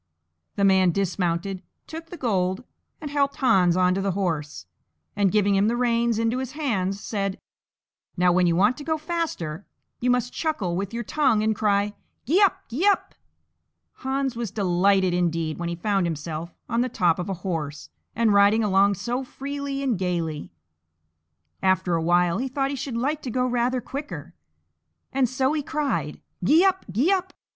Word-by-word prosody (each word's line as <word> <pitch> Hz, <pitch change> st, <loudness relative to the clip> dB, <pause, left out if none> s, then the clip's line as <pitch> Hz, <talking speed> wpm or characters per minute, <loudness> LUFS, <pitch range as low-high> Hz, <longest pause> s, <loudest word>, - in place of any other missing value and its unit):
The 200 Hz, -, 0 dB
man 190 Hz, -2 st, +5 dB
dismounted, 185 Hz, 0 st, -1 dB, 0.2 s
took 325 Hz, +1 st, -8 dB
the 350 Hz, -, -9 dB
gold, 190 Hz, -, 0 dB, 0.4 s
and 295 Hz, -2 st, -6 dB
helped 280 Hz, -1 st, +1 dB
Hans 185 Hz, -9 st, +3 dB
on 180 Hz, 0 st, +3 dB
to 195 Hz, -, -1 dB
the 195 Hz, -1 st, 0 dB
horse, 155 Hz, -, -3 dB, 0.5 s
and, 200 Hz, -2 st, +2 dB
giving 205 Hz, -1 st, +3 dB
him 195 Hz, +1 st, +3 dB
the 235 Hz, -, +1 dB
reins 235 Hz, -2 st, +1 dB
into 230 Hz, +2 st, 0 dB
his 260 Hz, 0 st, -5 dB
hands, 200 Hz, -10 st, -1 dB
said, 195 Hz, -2 st, -3 dB, 0.8 s
"Now, 180 Hz, 0 st, +4 dB
when 180 Hz, 0 st, +3 dB
you 170 Hz, -, +2 dB
want 205 Hz, +7 st, +3 dB
to 290 Hz, -, -7 dB
go 315 Hz, +1 st, 0 dB
faster, 310 Hz, -, -3 dB, 0.4 s
you 250 Hz, -, 0 dB
must 250 Hz, 0 st, +1 dB
chuckle 220 Hz, -, -1 dB
with 195 Hz, +1 st, -3 dB
your 235 Hz, +1 st, -3 dB
tongue 255 Hz, -4 st, +2 dB
and 220 Hz, 0 st, +1 dB
cry, 205 Hz, -1 st, +1 dB, 0.3 s
'Gee 335 Hz, -, +3 dB
up! 395 Hz, -4 st, +3 dB
gee 295 Hz, -, 0 dB
up!'" 405 Hz, -, +2 dB, 0.8 s
Hans 265 Hz, -1 st, -2 dB
was 235 Hz, -2 st, -3 dB
delighted 190 Hz, -1 st, +2 dB
indeed 165 Hz, -3 st, -1 dB
when 170 Hz, -1 st, -2 dB
he 170 Hz, -, -3 dB
found 195 Hz, 0 st, 0 dB
himself 160 Hz, +1 st, -5 dB, 0.2 s
on 230 Hz, 0 st, 0 dB
the 255 Hz, -, 0 dB
top 175 Hz, -7 st, +1 dB
of 180 Hz, -, -4 dB
a 195 Hz, -, -1 dB
horse, 155 Hz, -5 st, -4 dB, 0.2 s
and 225 Hz, -2 st, +3 dB
riding 205 Hz, +2 st, +5 dB
along 200 Hz, 0 st, +3 dB
so 240 Hz, +7 st, -3 dB
freely 280 Hz, +1 st, -5 dB
and 245 Hz, -8 st, 0 dB
gaily. 170 Hz, -5 st, -2 dB, 1.1 s
After 185 Hz, -1 st, +2 dB
a 165 Hz, -, +1 dB
while 175 Hz, +2 st, +2 dB
he 265 Hz, -, -1 dB
thought 270 Hz, +1 st, -1 dB
he -, -, -2 dB
should 265 Hz, -2 st, -4 dB
like 290 Hz, +5 st, -1 dB
to 255 Hz, -, -5 dB
go 250 Hz, +2 st, 0 dB
rather 250 Hz, 0 st, 0 dB
quicker, 285 Hz, +4 st, -7 dB, 0.8 s
and 260 Hz, -2 st, +2 dB
so 260 Hz, +2 st, +1 dB
he 310 Hz, -, 0 dB
cried, 295 Hz, 0 st, -2 dB, 0.2 s
"Gee 330 Hz, +5 st, +5 dB
up! 380 Hz, -1 st, +1 dB
gee 255 Hz, -, +2 dB
up!" 375 Hz, -1 st, 0 dB
210 Hz, 180 wpm, -24 LUFS, 180-265 Hz, 1.1 s, man